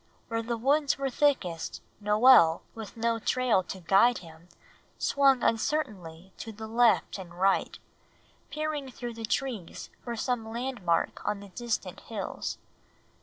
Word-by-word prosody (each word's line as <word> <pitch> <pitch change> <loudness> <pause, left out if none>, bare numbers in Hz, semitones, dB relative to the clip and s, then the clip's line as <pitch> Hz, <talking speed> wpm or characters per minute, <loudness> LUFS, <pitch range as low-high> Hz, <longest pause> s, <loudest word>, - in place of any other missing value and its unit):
Where 230 0 -1
the 235 +1 -3
woods 280 +4 +2
were 275 -1 -2
thickest 220 - 0 0.2
Noel, 210 -5 +6
with 220 -1 -9
no 230 0 0
trail 245 -3 +2
to 190 +1 -7
guide 200 +8 +4
him, 165 0 -13 0.5
swung 275 -3 +3
uncertainly 190 - -1
to 225 - -7
left 220 0 +1
and 175 -2 -10
right, 195 +1 +2 0.7
peering 300 -2 -3
through 240 -1 -6
the 225 0 -5
trees 225 -7 -3
for 235 -1 -4
some 230 -1 -2
landmark 230 -8 -1
on 205 - -1
the 200 0 -11
distant 200 -4 -3
hills. 215 -4 -5
225 Hz, 130 wpm, -28 LUFS, 190-255 Hz, 0.7 s, Noel